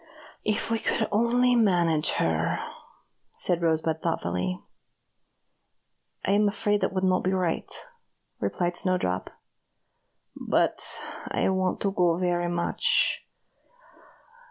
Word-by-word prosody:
If 215 +1 -1
we 225 - +1
could 220 0 0
only 245 +3 +3
manage 175 -8 +3
her," 80 0 0 0.8
said 175 -1 +1
Rosebud, 160 -1 0
thoughtfully. 90 - -2 1.7
"I - - +1
am 205 +1 +4
afraid 205 0 0
it - - +1
would 185 0 -2
not 185 -1 +2
be 185 - +1
right," 180 -3 -1 0.7
replied 175 -1 -1
Snowdrop, 175 - 0 1.1
"but - - 0 0.5
I - - +1
want 185 -1 0
to 200 - +1
go 175 -3 +2
very 175 -1 0
much. 175 0 +1
180 Hz, 110 wpm, -26 LUFS, 165-205 Hz, 1.7 s, am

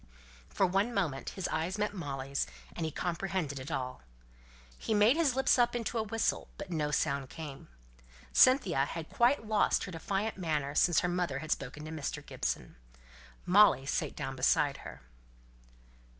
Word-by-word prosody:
For 195 - +2
one 195 +6 0
moment 155 -9 -1
his 190 - -1
eyes 170 +5 -2
met 210 0 -1
Molly's, 140 -6 -3 0.3
and 165 - -2
he - - -4
comprehended 175 -4 -2
it 130 +3 -7
all. 130 -5 -4 0.8
He 220 - -1
made 210 +6 +5
his 310 -6 +2
lips 265 -1 +3
up 240 0 +3
into 235 0 -2
a - - +1
whistle, 225 +1 -1
but 200 -2 -7
no 150 -3 0
sound 140 -2 0
came. 150 -4 -8 0.7
Cynthia 200 - +5
had 160 +2 -6
quite 240 0 +3
lost 215 -1 +2
her 185 - -6
defiant 195 +6 -2
manner 150 -5 -1
since 175 +1 +4
her 180 - 0
mother 175 -6 -1
had 155 +2 -6
spoken 140 +3 -3
to 155 - -7
Mr. 155 -3 -4
Gibson. - - -4 0.7
Molly 185 -8 +5
sate 145 - -2
down 135 -2 -4
by 140 +2 +3
her. - - -10
170 Hz, 165 wpm, -31 LUFS, 145-210 Hz, 0.8 s, made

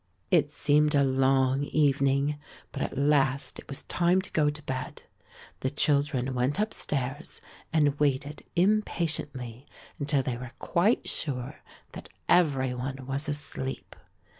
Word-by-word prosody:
It - - +4
seemed 150 0 +2
a 140 - +5
long 135 0 +2
evening, 140 0 +2 0.3
but - - -5
at - - -3
last 140 -1 +1
it - - -12
was 135 - -5
time 175 +2 +2
to - - -6
go 150 -2 +3
to 150 0 -6
bed. 130 -2 -5 0.6
The 130 - -1
children 140 -2 +1
went 125 +3 0
upstairs 145 - -2 0.3
and 150 -3 +2
waited 145 0 0
impatiently 160 - 0 0.3
until 145 -1 +1
they 125 -2 -2
were 125 0 -8
quite 200 +8 +1
sure 130 -4 -2 0.3
that - - -9 0.2
every 140 -7 +3
one 130 +1 -5
was 135 +3 -2
asleep. 140 -2 -5
140 Hz, 135 wpm, -28 LUFS, 130-150 Hz, 0.6 s, a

